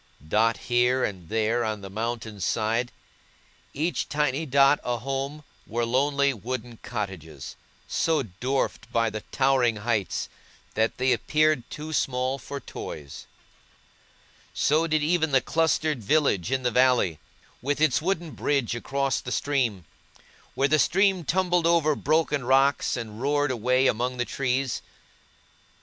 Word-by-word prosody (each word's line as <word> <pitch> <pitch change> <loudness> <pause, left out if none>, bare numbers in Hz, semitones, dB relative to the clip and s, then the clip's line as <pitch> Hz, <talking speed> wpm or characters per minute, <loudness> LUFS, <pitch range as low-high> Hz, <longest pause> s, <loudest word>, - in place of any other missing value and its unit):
Dotted 110 +6 +2
here 125 +1 +2
and 90 -5 -4
there 115 +2 +1
on 110 -2 -3
the 100 - -8
mountain's 110 -2 -4
side, 115 +6 0 0.8
each 160 +5 -2
tiny 150 +1 0
dot 140 +2 +5
a 120 -1 -1
home, 135 +4 -4 0.2
were 120 +1 -1
lonely 140 +3 +2
wooden 120 +1 -6
cottages, 90 - -6 0.3
so 160 -4 +1
dwarfed 125 +7 -3
by 115 -1 +1
the 110 0 -5
towering 130 -4 +3
heights 105 -2 -1 0.5
that 110 +1 0
they 130 +1 +2
appeared 155 -5 +1
too 155 +1 -6
small 130 -1 0
for 140 +3 -6
toys. 75 - -8 1.3
So 155 +3 +2
did 155 -2 +1
even 160 -2 +1
the 135 - +6
clustered 155 -2 0
village 125 - +2
in 130 -1 0
the 125 - +1
valley, 125 - +3 0.4
with 145 +4 -1
its 155 -4 +3
wooden 175 -2 -1
bridge 140 -6 0
across 135 +2 -1
the 125 - -6
stream, 125 - 0 0.7
where 135 - +2
the 155 +1 +3
stream 190 +2 +3
tumbled 180 0 +1
over 160 -3 +3
broken 150 -2 +1
rocks, 135 +2 +3
and 110 -2 -7
roared 145 0 +1
away 125 +2 +2
among 125 +1 0
the 120 - 0
trees. 130 -1 -1
130 Hz, 135 wpm, -26 LUFS, 115-145 Hz, 1.3 s, the